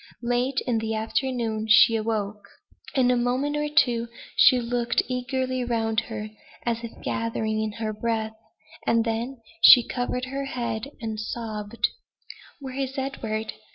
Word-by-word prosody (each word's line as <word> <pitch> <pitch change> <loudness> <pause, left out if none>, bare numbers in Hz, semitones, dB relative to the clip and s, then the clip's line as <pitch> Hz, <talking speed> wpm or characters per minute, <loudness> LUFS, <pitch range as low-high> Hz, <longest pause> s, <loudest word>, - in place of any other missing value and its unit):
Late 245 +3 +1
in 235 -3 +1
the 220 0 -2
afternoon 225 -1 -1
she 225 +1 +7
awoke. 215 -2 -2 0.5
In 250 -2 +4
a - - +3
moment 250 +4 0
or 295 0 -1
two 245 -7 +3 0.3
she 255 -2 +7
looked 240 0 0
eagerly 255 0 -1
round 225 -2 0
her, 215 -1 -5 0.3
as 230 -1 -1
if 230 - -9
gathering 220 -1 -1
in 215 -1 -2
her 220 0 -3
breath; 220 0 -2 0.5
and 230 0 +3
then 235 +3 -2 0.2
she 245 -3 +9
covered 250 0 -2
her 275 +1 -4
head 235 -2 -3
and 220 -2 -4
sobbed. 215 0 -2 0.7
"Where 265 -1 -6
is 270 0 -3
Edward?" 225 -5 -3
235 Hz, 145 wpm, -25 LUFS, 220-255 Hz, 0.7 s, she